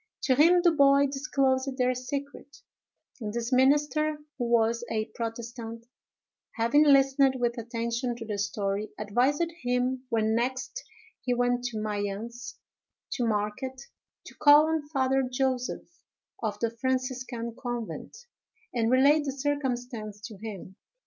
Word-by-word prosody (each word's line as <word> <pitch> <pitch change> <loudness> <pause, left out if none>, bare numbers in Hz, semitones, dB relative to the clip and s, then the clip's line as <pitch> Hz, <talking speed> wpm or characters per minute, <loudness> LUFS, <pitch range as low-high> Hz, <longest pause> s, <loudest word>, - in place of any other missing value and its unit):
To 260 - +3
him 335 +6 +5
the 345 - +6
boy 280 -2 +5
disclosed 270 -1 0
their 250 -1 +2
secret; 280 +2 -6 0.6
and 215 -3 -4
this 235 +3 -3
minister, 295 +3 +3 0.2
who 240 - 0
was 235 0 +2
a 215 -1 -1
protestant, 230 0 -6 0.7
having 235 +6 +3
listened 275 -2 +5
with 240 -1 0
attention 235 +1 -2
to 230 -1 -8
the 210 -2 -4
story, 200 +1 -2
advised 255 +11 +1
him, 250 +1 0
when 220 -1 +1
next 260 - -2 0.4
he 250 -1 0
went 245 0 +1
to 240 -3 -3
Mayence, 215 +3 -4 0.6
to 245 -3 0
market, 215 +5 -2 0.5
to - - -11
call 295 +1 +7
on 320 -2 -1
Father 270 -2 +1
Joseph, 260 +5 -2 0.4
of 210 -2 -2
the 230 -1 +1
Franciscan 255 -1 -3
convent, 240 -3 -5 0.6
and 230 -2 +1
relate 280 +4 +5
the 275 - -1
circumstance 250 -6 -3
to 220 0 -8
him. 195 -3 -8
250 Hz, 130 wpm, -28 LUFS, 230-275 Hz, 0.7 s, call